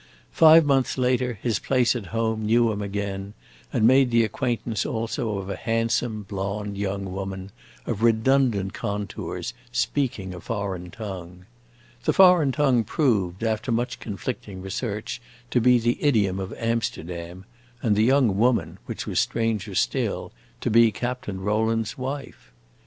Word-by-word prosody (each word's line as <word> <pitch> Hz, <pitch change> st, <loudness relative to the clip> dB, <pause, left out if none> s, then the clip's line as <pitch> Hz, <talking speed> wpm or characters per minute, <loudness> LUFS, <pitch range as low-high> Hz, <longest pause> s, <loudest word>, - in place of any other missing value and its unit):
Five 160 Hz, 0 st, +7 dB
months 135 Hz, -2 st, +2 dB
later 125 Hz, -2 st, +1 dB
his 115 Hz, -5 st, +1 dB
place 125 Hz, -2 st, +2 dB
at 110 Hz, -6 st, -5 dB
home 110 Hz, +1 st, -1 dB
knew 115 Hz, +1 st, +4 dB
him 105 Hz, -1 st, -3 dB
again, 100 Hz, 0 st, -4 dB, 0.4 s
and 110 Hz, -, +2 dB
made 130 Hz, +2 st, +5 dB
the 115 Hz, -1 st, +4 dB
acquaintance 115 Hz, -2 st, -1 dB
also 115 Hz, -1 st, -2 dB
of 95 Hz, -1 st, -5 dB
a 100 Hz, -, -3 dB
handsome, 115 Hz, 0 st, -1 dB
blonde 100 Hz, +1 st, -4 dB
young 100 Hz, -1 st, -3 dB
woman, 95 Hz, 0 st, -5 dB, 0.3 s
of 110 Hz, -2 st, -3 dB
redundant 115 Hz, -3 st, +2 dB
contours, 100 Hz, 0 st, -4 dB, 0.2 s
speaking 115 Hz, -10 st, -1 dB
a 90 Hz, -, -7 dB
foreign 100 Hz, -6 st, -4 dB
tongue. 90 Hz, -3 st, -8 dB, 0.6 s
The -, -, +3 dB
foreign 180 Hz, -7 st, +6 dB
tongue 130 Hz, -4 st, +2 dB
proved, 105 Hz, -, 0 dB
after 110 Hz, +3 st, -1 dB
much 120 Hz, +2 st, -1 dB
conflicting 100 Hz, -3 st, -6 dB
research, 105 Hz, +3 st, -4 dB, 0.3 s
to 125 Hz, -, +3 dB
be 125 Hz, +1 st, +6 dB
the 120 Hz, +1 st, 0 dB
idiom 105 Hz, -10 st, +2 dB
of 95 Hz, -1 st, -5 dB
Amsterdam, 90 Hz, -6 st, -3 dB, 0.4 s
and 110 Hz, -3 st, +3 dB
the 105 Hz, -, +3 dB
young 125 Hz, -4 st, +4 dB
woman, 105 Hz, -8 st, +1 dB
which -, -, -5 dB
was -, -, 0 dB
stranger 110 Hz, -3 st, -1 dB
still, -, -, -1 dB, 0.3 s
to -, -, -1 dB
be 115 Hz, 0 st, +6 dB
Captain 120 Hz, -4 st, -4 dB
Rowland's 110 Hz, +2 st, 0 dB
wife. 135 Hz, -, -6 dB
110 Hz, 145 wpm, -25 LUFS, 100-120 Hz, 0.6 s, Five